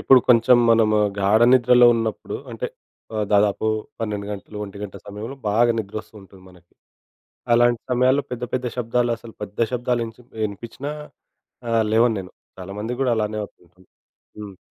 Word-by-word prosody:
ఇప్పుడు 130 -1 +6
కొంచెం 120 0 +6
మనము 110 -2 +4 0.2
గాఢ 100 +3 +3
నిద్రలో 125 -1 +6
ఉన్నప్పుడు 115 -1 -3
అంటే - - -4 0.5
ఆహ్, 105 - 0
దాదాపు 105 +1 +2 0.3
12 105 -2 -3
గంటలు 105 +1 -9
ఒంటి 100 0 -10
గంట 100 -2 -7
సమయంలో 105 +6 -7
బాగా 120 +3 +3
నిద్రొ‌స్తూంటుంది 100 -2 -8
మనకి. 90 -1 -22 0.8
అలాంటి 120 0 +4
సమయాల్లో 130 +3 +3
పెద్ద 125 -1 -4
పెద్ద 125 0 -1
శబ్దాలు 120 0 0
అసలు 115 0 -13
పెద్ద 105 0 -8
శబ్దాలు 120 -1 0
ఇంచ్ 115 +2 -12 0.3
ఇనిపిచ్చినా 115 +8 -7 0.8
ఆహ్, 115 -1 +2
లేవను 115 0 +3
నేను. 90 -1 -11 0.3
చాలామందిగూడా 110 +7 -2
అలానే 110 0 -2
అవుతుంటుంది. 90 -1 -20 0.5
హ్మ్. 100 -3 -9
110 Hz, 140 wpm, -22 LUFS, 100-120 Hz, 0.8 s, ఇప్పుడు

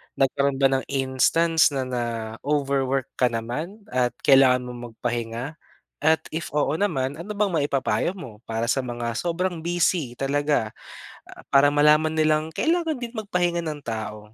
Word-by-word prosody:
nagkaroon 140 +1 +1
ba 135 - +6
ng 130 -1 0
instance 145 +4 +2
na 135 - 0
na-overwork 130 +3 -1
ka 125 - +5
naman 125 - -4
at 125 -1 +1
kailangan 135 -2 +6
mo 125 - -7 0.2
magpahinga? 120 +5 -4 0.5
At 160 +1 +4 0.2
if 170 - -4
oo 145 -1 +1
naman, 145 -8 -1
ano 200 +5 -6
bang 205 -2 +1
maipapayo 140 -4 0
mo 125 - -9
para 115 +1 -2
sa 135 - +1
mga 120 -1 -4
sobrang 175 +1 -1
busy 170 -6 +1
talaga, 140 -4 0 0.6
ah, - - -13
para 140 +1 +6
malaman 150 +2 +4
nilang 155 0 +2
kailangan 325 -2 +1
din 240 -1 -6
magpahinga 180 -6 -1
ng 150 -2 -5
tao? 110 -2 -4
140 Hz, 145 wpm, -24 LUFS, 125-165 Hz, 0.6 s, ba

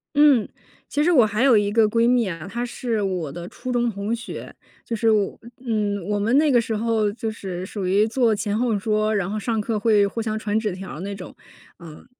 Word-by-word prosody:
嗯， 290 -6 +5 0.4
其 295 - 0
实 350 - +3
我 250 -9 +6
还 215 +3 0
有 260 -5 +6
一 205 0 +1
个 220 -1 +4
闺 230 +2 +2
蜜 245 -3 +3
啊， 165 -1 -6
她 235 +2 -3
是 235 -2 -2
我 180 -7 -2
的 175 +4 -7
初 255 - -6
中 240 -1 +1
同 205 +1 -2
学， 235 - -8 0.3
就 230 - -3
是 225 0 +2
我 210 -2 +1 0.3
嗯， 205 -4 -1
我 205 0 0
们 225 +5 +1
那 300 -1 +4
个 240 -2 +5
时 225 0 -3
候 220 -2 +1
就 225 0 -4
是 185 -4 -6
属 190 -1 -4
于 205 +3 +3
坐 230 -2 +2
前 205 0 -2
后 235 -1 +1
桌， 215 +1 0
然 195 -3 -1
后 215 +1 -2
上 225 +1 -1
课 215 0 -1
会 210 -1 +4
互 215 +3 -3
相 220 -1 -2
传 215 0 -1
纸 215 -3 -2
条 190 +1 -7
儿 - - -8
那 200 +2 -5
种， 185 -2 -10 0.5
嗯。 155 - -13
215 Hz, 250 characters per minute, -23 LUFS, 200-235 Hz, 0.5 s, 我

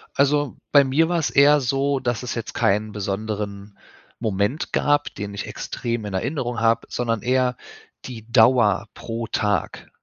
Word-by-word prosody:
Also, 145 -1 +1
bei 145 -1 +7
mir 140 +5 +2
war 175 -1 +1
es 160 - 0
eher 145 +1 +5
so, 135 +2 0
dass 120 -3 -2
es 125 - -4
jetzt 115 -1 -5
keinen 110 -2 +1
besonderen 100 0 -4 0.4
Moment 110 +5 -1
gab, 145 0 +1
den 100 0 -6
ich 100 - -5
extrem 115 -2 -4
in 100 - -5
Erinnerung 120 +3 -2
habe, 115 0 +2
sondern 115 -3 -2
eher 125 0 +1 0.5
die 115 -3 -9
Dauer 115 -4 +4
pro 115 0 -5
Tag. 105 -1 -2
120 Hz, 155 wpm, -22 LUFS, 105-135 Hz, 0.5 s, bei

